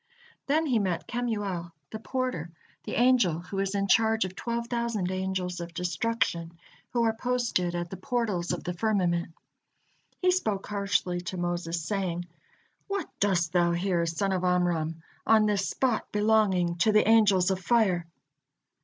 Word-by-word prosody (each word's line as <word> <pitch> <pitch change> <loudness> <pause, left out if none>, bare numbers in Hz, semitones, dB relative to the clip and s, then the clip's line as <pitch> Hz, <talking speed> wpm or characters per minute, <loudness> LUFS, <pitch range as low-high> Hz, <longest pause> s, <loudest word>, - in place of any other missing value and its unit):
Then 310 +3 +2
he 250 -7 +2
met 185 -4 -1
Kemuel, 205 -8 -3 0.2
the 220 - -5
porter, 255 - -3 0.4
the - - -4
angel 240 -10 +3
who 185 +3 -6
is 195 0 -1
in 200 0 0
charge 220 0 +3
of 185 0 -7
twelve 235 +1 -3
thousand 235 -6 -2
angels 185 -1 -2
of 170 0 -7
destruction, 175 -1 -1 0.3
who 240 -1 +1
are 225 -1 +2
posted 230 -7 -1
at 175 0 -3
the 190 - -5
portals 200 -4 -1
of - - -3
the 180 - -3
firmament. 175 -4 0 0.9
He 365 0 +3
spoke 215 - -1
harshly 195 -3 -1
to 185 - -4
Moses, 175 -1 -2
saying: 175 -2 -2 0.6
"What 395 -4 -3
dost 180 -5 +1
thou 175 -1 +3
here, 175 -1 0
son 180 +4 -1
of 185 -1 -1
Amram, 170 -3 0 0.2
on 220 -1 +5
this 200 -2 +1
spot, 250 -4 -1
belonging 205 -5 +2
to 195 +6 +3
the 215 0 +4
angels 200 -5 +5
of 190 - -1
fire?" 190 -5 +2
190 Hz, 155 wpm, -28 LUFS, 175-225 Hz, 0.9 s, on